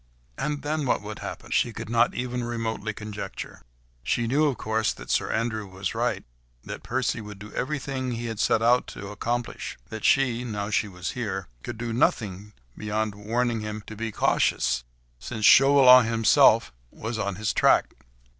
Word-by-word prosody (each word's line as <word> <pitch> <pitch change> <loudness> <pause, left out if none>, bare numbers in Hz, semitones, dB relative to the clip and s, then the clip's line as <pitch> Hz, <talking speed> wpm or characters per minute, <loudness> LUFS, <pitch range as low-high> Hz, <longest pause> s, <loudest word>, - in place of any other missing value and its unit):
And 145 - -3
then 150 -1 -1
what - - +1
would - - -7
happen? - - -7
She 120 - +2
could 110 0 -7
not 120 +1 +2
even 125 0 -3
remotely 115 -2 -3
conjecture. 105 -2 -7 0.4
She 115 - 0
knew, 140 +6 +2
of 140 -6 0
course, 110 0 0
that - - -8
Sir - - +1
Andrew 110 -2 -1
was 95 0 -4
right, - - -1 0.4
that - - -6
Percy - - -1
would 105 -1 -9
do 105 +2 -11
everything 130 -2 -3
he 120 0 -4
had 115 -2 -5
set 110 - +2
out 120 +2 +4
to 100 - -8
accomplish; 120 +3 -3
that 110 -1 -7
she—now 115 -6 +1
she 105 - +1
was 90 -2 -5
here—could 95 - -5
do 115 0 -4
nothing, 105 -3 0 0.2
beyond 105 0 -2
warning 115 +3 -1
him 105 0 -5
to 110 - -9
be 115 +1 -4
cautious, 65 -9 +1 0.4
since 110 -2 -3
Chauvelin 130 -3 +8
himself 115 -1 +4 0.2
was 110 - -5
on 100 -3 -2
his 105 +2 -1
track. - - +3
115 Hz, 165 wpm, -26 LUFS, 105-120 Hz, 0.4 s, Chauvelin